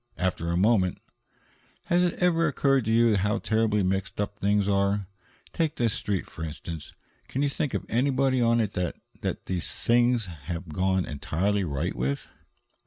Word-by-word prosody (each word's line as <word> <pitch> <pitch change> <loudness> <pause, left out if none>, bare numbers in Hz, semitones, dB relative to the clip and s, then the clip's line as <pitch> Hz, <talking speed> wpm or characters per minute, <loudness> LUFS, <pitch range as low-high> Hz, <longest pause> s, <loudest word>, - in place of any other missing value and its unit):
After 90 -2 -1
a 85 - +1
moment: 95 -2 +3 0.9
"Has 175 +1 +3
it 180 -1 +1
ever 170 -2 +2
occurred 135 -3 +2
to 110 - 0
you 115 -2 +4
how 105 +4 +1
terribly 110 -2 +1
mixed 95 +2 -1
up 105 0 -2
things 100 0 +2
are? 100 0 +1 0.5
Take 160 -2 0
this 115 -3 +1
Street, 100 -3 -1
for 80 - -8
instance. 80 0 -6 0.4
Can 135 - -1
you 145 - +2
think 140 0 -2
of - - -2
anybody 130 +1 +2
on 115 0 +3
it 105 -3 0
that 90 -2 -2 0.3
that - - -3
things 120 +6 +1
have 85 0 -7
gone 95 +3 +1
entirely 95 +8 -1
right 70 -6 -2
with?" 70 +3 -3
105 Hz, 165 wpm, -27 LUFS, 90-120 Hz, 0.9 s, you